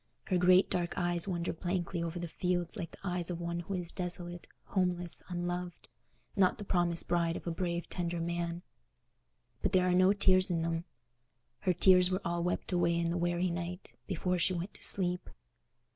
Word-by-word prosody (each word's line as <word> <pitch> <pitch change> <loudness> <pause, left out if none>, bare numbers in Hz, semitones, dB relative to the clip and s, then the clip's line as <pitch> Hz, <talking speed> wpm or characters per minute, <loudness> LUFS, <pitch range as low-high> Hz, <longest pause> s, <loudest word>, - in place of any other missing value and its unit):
Her 185 -2 0
great 180 +1 +6
dark 175 -1 -2
eyes 175 0 0
wander 175 -2 -2
blankly 175 0 -2
over 170 +1 -3
the 175 0 -4
fields 175 +1 -1
like 180 -6 -4
the - - -15
eyes 180 -1 -1
of 175 -1 -3
one 170 0 -3
who 180 +3 -4
is 175 -2 -4
desolate, 175 -1 -3 0.2
homeless, 180 -3 -1
unloved, 175 0 -4 0.5
not 190 -3 +3
the 210 - -6
promised 175 -3 0
bride 170 -1 +1
of - - -10
a 170 - -1
brave 170 0 -2
tender 175 -1 -3
man. 170 +1 -3 1.0
But - - -1
there 185 -1 +4
are 180 - +3
no 185 +1 +5
tears 190 -2 +4
in 165 -2 0
them: 165 0 -2 0.7
her 185 - +1
tears 180 +1 +6
were 185 0 0
all 170 0 -1
wept 180 +2 -2
away 175 -1 +2
in 170 0 0
the - - -1
weary 175 +1 0
night, 175 +2 -5
before 180 -1 -1
she 185 +2 +2
went 175 +4 -4
to - - -10
sleep. 180 -2 +4
175 Hz, 190 wpm, -32 LUFS, 170-180 Hz, 1.0 s, great